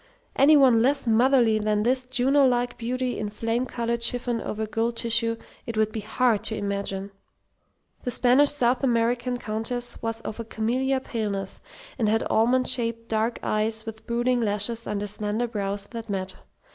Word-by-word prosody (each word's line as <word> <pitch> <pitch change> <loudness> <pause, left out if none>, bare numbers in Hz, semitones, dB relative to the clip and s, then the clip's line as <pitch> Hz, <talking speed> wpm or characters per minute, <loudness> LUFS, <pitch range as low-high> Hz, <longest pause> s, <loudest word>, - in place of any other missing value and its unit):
Any 295 +2 +6
one 255 -5 +5
less 275 +3 +1
motherly 235 -1 +4
than 210 0 0
this 255 +2 0
Juno 270 +2 +3
like 245 -1 0
beauty 250 +1 -2
in 210 -1 -3
flame 230 +4 -2
coloured 235 -1 -2
chiffon 240 0 0
over 220 +1 -3
gold 225 +2 -2
tissue 230 0 +1 0.3
it 230 -2 -4
would 215 0 +2
be 220 - -4
hard 220 0 +1
to 220 - -2
imagine. 200 -1 -3 0.9
The - - -2
Spanish 255 +4 +4
South 255 -2 +2
American 240 0 +1
Countess 225 +2 -3
was 225 0 -3
of 225 - -6
a - - -3
camelia 255 +5 -1
paleness, 205 -6 -4 0.4
and 220 -3 +2
had 225 +1 +2
almond 245 +3 +3
shaped 230 -1 -1
dark 225 +2 0
eyes 220 +1 0
with 220 -1 -9
brooding 240 +1 +1
lashes 220 +2 0
under 205 0 -2
slender 210 +3 -2
brows 200 -3 -2
that 230 -2 -7
met. 190 -1 -3
230 Hz, 165 wpm, -25 LUFS, 215-245 Hz, 0.9 s, Any